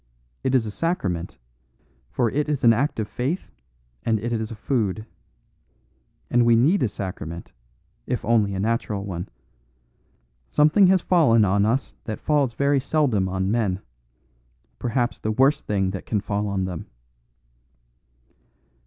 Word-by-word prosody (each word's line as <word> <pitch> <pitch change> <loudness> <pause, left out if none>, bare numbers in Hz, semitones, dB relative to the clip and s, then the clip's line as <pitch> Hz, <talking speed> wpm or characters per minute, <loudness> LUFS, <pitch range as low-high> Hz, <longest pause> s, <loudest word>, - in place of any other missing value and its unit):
It 130 0 +1
is 120 -4 +3
a 105 - -4
sacrament; 100 - -2 0.7
for 120 -3 0
it 150 +2 -1
is 145 -3 -1
an 115 -1 +7
act 130 +2 0
of 110 - -1
faith 135 - -3 0.5
and 110 -2 +1
it 120 +3 -3
is 110 -1 -2
a 115 - -7
food. 110 -3 -1 1.3
And 120 0 +4
we 120 0 +5
need 150 - +3
a 120 - +2
sacrament, 90 -4 -6 0.6
if - - -2
only 105 -4 +2
a - - -3
natural 105 -2 -1
one. 90 -3 -5 1.2
Something 155 +6 +5
has 185 -1 +3
fallen 125 - +4
on 100 +2 +2
us 125 +3 -1
that 110 - -4
falls 145 -5 +1
very 140 0 +2
seldom 125 -10 +1
on 95 +1 -1
men; 105 -5 0 1.0
perhaps 120 0 -1
the 110 - -2
worst 135 +6 +2
thing 95 -2 0
that 95 - -7
can 105 - 0
fall 105 +1 -2
on 95 -2 -1
them." 90 -3 -6
115 Hz, 145 wpm, -24 LUFS, 100-135 Hz, 1.3 s, an